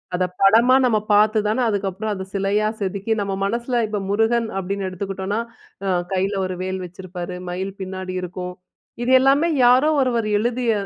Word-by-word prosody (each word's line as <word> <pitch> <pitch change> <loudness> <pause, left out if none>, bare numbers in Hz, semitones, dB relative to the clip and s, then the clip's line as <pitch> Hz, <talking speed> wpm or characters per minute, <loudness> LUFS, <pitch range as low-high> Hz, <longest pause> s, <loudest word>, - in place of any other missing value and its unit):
அத 185 - +1 0.2
படமா 225 +6 +6
நம்ம 230 -3 +3 0.2
பார்த்து 215 +1 +4
தானே 220 +4 0
அதுக்கப்புறம் 205 +1 -2
அத 190 -1 -5
சிலையா 200 +2 +1
செதுக்கி, 200 +3 -3
நம்ம 195 -1 -2
மனசில 235 +3 -1
இப்ப 205 -2 -3
முருகன் 225 +3 +2
அப்டின்னு 195 +1 -3
எடுத்துக்கிட்டோம்னா, 195 +2 -3 0.5
அ 195 - 0 0.2
கையில 190 +2 0
ஒரு 185 - -4
வேல் 185 0 -3
வச்சிருப்பாரு. 180 0 -7
மயில் 190 +2 -4
பின்னாடி 185 0 -5
இருக்கும். 180 0 -5 0.5
இது 245 - 0
எல்லாமே 275 +5 +4 0.2
யாரோ 255 +5 +5
ஒருவர் 240 -4 +1
எழுதிய 240 +2 0
200 Hz, 155 wpm, -21 LUFS, 190-230 Hz, 0.5 s, படமா